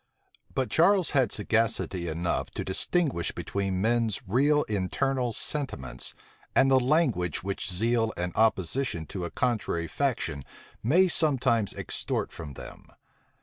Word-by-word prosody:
But 130 -2 -1
Charles 185 +2 +4
had 130 -7 +2
sagacity 105 -4 0
enough 85 +2 -1
to - - -3
distinguish 130 - +1
between 95 -2 -2
men's 115 -1 +1
real 145 +8 +3
internal 120 +6 -1
sentiments, 65 - -3 0.4
and 135 0 +5
the 130 - +6
language 125 - +1
which 100 0 -3
zeal 115 +4 +1
and 90 0 -3
opposition 110 -2 +1
to 90 +3 -5
a - - -4
contrary 105 -9 -1
faction 85 - -2 0.4
may 170 - +4
sometimes 130 - +2
extort - - -3
from 75 -3 -8
them. - - -11
115 Hz, 125 wpm, -28 LUFS, 90-135 Hz, 0.4 s, the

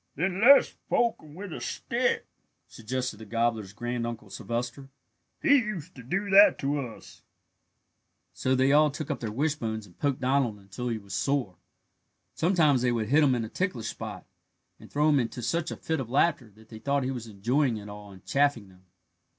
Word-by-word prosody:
"Then 180 +5 -1
let's 275 +5 +7 0.2
poke 235 -1 +1
him 150 -1 -14
with 190 -1 -7
a - - -6
stick," 120 0 -1 0.4
suggested 125 +2 -4
the 110 - -10
gobbler's 115 -2 -1
Granduncle 120 -1 -4
Sylvester; 120 +5 -4 0.5
"he 285 - +6
used 210 - -3
to 130 - -11
do 190 - -2
that 200 +2 +8
to 145 +1 -1
us." 125 -5 -9 1.1
So 130 0 0
they 130 +1 +3
all 150 +1 +5
took 145 +1 -5
up - - -3
their 110 -3 -4
wishbones 115 -5 -2
and 90 -3 -19
poked 140 -2 0
Donald 130 -4 +1
until 100 +5 -7
he 115 - -1
was 100 -2 -10
sore. 135 -7 0 0.8
Sometimes 160 -7 +3
they 125 -1 +2
would 110 -3 -1
hit 150 +3 +5
him 135 -3 +4
in 115 -2 -2
a - - -8
ticklish 150 - -2
spot, - - -7 0.5
and - - -15
throw 150 +1 +2
him 145 -2 +4
into 120 0 -3
such 170 +3 -1
a - - -4
fit 160 -2 -2
of 125 -4 -5
laughter 140 -2 +2
that 110 +2 -20
they 110 - -10
thought 140 +4 0
he 130 - -1
was 120 -3 -6
enjoying 115 +5 0
it 105 0 -9
all 105 0 -10
and 95 -1 -15
chaffing 140 -8 +1
them. 95 0 -21
125 Hz, 190 wpm, -28 LUFS, 110-150 Hz, 1.1 s, that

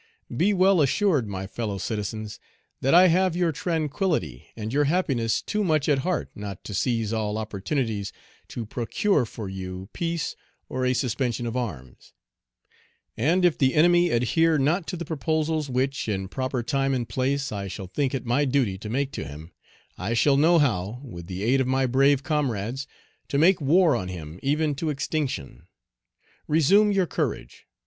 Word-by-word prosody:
Be 180 - +3
well 190 -2 +4
assured, 145 - +2
my 95 -1 -4
fellow 100 0 -4
citizens, 110 +1 -4 0.4
that 135 +5 +3
I 180 +1 +8
have 185 +1 +2
your 175 -2 +1
tranquillity 160 - -2
and 110 +1 -4
your 145 +1 +3
happiness 135 - 0
too 210 0 -1
much 155 -6 +1
at 145 -3 +3
heart 180 +5 -2
not 100 -3 -7
to 105 - -7
seize 115 0 0
all 110 -1 -1
opportunities 110 0 -2 0.4
to 120 - -6
procure 125 - 0
for 110 -2 -7
you 95 0 -6
peace 170 -3 -2 0.3
or 130 0 -1
a 125 - +2
suspension 120 -1 -1
of 115 0 -3
arms; 80 - -6 1.0
and, 170 +10 +2
if 175 - +2
the 130 -1 +3
enemy 175 +2 +5
adhere 155 +6 +2
not 160 +6 +1
to 180 - -4
the 170 - -5
proposals 155 -1 -1
which, 130 -1 -1
in 95 -2 -2
proper 130 +1 -2
time 135 +1 0
and 120 -3 -2
place, 135 +4 -1
I 100 -2 -4
shall 95 +1 -6
think 135 +8 -1
it 125 - -4
my 125 +5 +2
duty 125 -8 0
to 105 - -7
make 135 +4 -1
to - - -5
him, 75 +4 -9 0.5
I 100 +6 -1
shall 135 +5 +4
know 165 +5 +5
how, 115 - 0
with 85 -10 -9
the 95 +1 -5
aid 130 +4 +3
of 130 - 0
my 130 0 +2
brave 135 +2 +3
comrades, 135 -4 -2 0.4
to 140 - -1
make 170 +3 +4
war 160 +3 +4
on 95 - -3
him 85 -2 -7
even 150 +2 +1
to 160 +2 -2
extinction. 135 - -3 0.8
Resume 195 +8 +4
your 195 -2 +2
courage. - - -4
130 Hz, 170 wpm, -25 LUFS, 110-155 Hz, 1.0 s, I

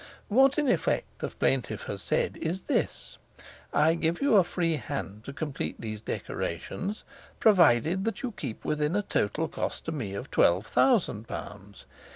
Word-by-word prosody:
"What 265 +5 +5
in 300 -2 +2
effect 250 - 0
the - - -2
plaintiff - - -1
has - - -5
said 485 -2 0
is 175 +3 -3
this - - -2 0.5
'I 155 +3 +4
give 165 0 0
you 280 -5 +3
a 195 - +7
free 170 -2 0
hand 110 -9 -5
to - - -5
complete 145 0 -4
these 110 -2 -5
decorations, 190 - -4 0.4
provided 175 - +5
that 225 - -2
you 250 - -2
keep 135 - -7
within 150 +3 0
a 205 - +1
total 155 - 0
cost - - -4
to 165 - -2
me 115 -11 -4
of 100 - -6
twelve 90 +5 +4
thousand 165 - +2
pounds. 100 +1 -8
160 Hz, 165 wpm, -28 LUFS, -, 0.5 s, a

